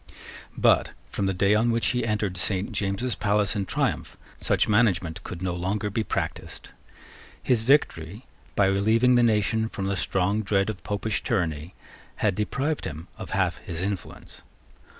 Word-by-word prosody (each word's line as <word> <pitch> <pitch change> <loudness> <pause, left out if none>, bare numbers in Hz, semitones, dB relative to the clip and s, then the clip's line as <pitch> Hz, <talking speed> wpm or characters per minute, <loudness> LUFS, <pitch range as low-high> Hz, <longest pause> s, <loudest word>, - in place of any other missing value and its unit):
But, - - +3 0.2
from 100 - -1
the - - +1
day 100 +2 +3
on 110 +3 +3
which 115 0 +2
he 125 -1 0
entered 105 -4 -1
Saint 95 +1 -1
James's 100 +5 -1
palace 105 0 +1
in 100 -2 -2
triumph, - - -2 0.2
such - - +2
management 95 -7 +2
could 90 0 -7
no 90 -2 -1
longer 100 +4 -2
be 110 +2 0
practised. - - -4 0.7
His 115 -3 +2
victory, 110 - +1 0.3
by 100 - +4
relieving 110 +6 +3
the 120 - +5
nation 110 0 +2
from 100 - -4
the 100 0 0
strong 95 +3 0
dread 100 0 +1
of 100 - -12
Popish 105 +1 -2
tyranny, 85 -6 -2 0.4
had 105 -3 +1
deprived 140 +10 -2
him 80 +4 -7
of - - -7
half - - 0
his 85 +1 -5
influence. 100 -1 -6
100 Hz, 160 wpm, -26 LUFS, 95-110 Hz, 0.7 s, the